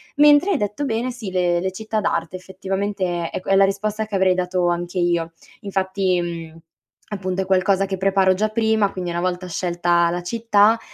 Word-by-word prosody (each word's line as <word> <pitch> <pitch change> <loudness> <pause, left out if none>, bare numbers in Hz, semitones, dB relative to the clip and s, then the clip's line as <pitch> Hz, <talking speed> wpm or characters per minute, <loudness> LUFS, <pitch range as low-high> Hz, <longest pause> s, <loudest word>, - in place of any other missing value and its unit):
Mentre 295 +6 +5
hai 365 - +2
detto 210 +5 -2
bene, 240 0 -1
sì, 225 -6 -7
le 175 -1 +1
le 190 +2 -2
città 220 +3 -3
d'arte 170 -2 -2
effettivamente 190 -2 -3
è - - -16
è - - -2
que 185 - -4
è - - +5
la 195 0 +6
risposta 210 +2 -2
che 210 -2 -5
avrei 190 -1 +3
dato 180 0 0
anche 175 +1 -2
io, 170 -2 0 0.3
infatti, 190 -2 0
mhmm, 165 -2 -6 0.5
appunto 190 -2 -3
è - - -10
qualcosa 190 +1 +2
che 190 0 -4
preparo 190 0 +3
già 215 +3 0
prima, 220 -2 +1
quindi 180 -2 -4
una 170 0 -2
volta 180 0 -2
scelta 175 -1 +1
la 175 +1 -3
città 220 +2 +3
190 Hz, 200 wpm, -21 LUFS, 175-205 Hz, 0.5 s, la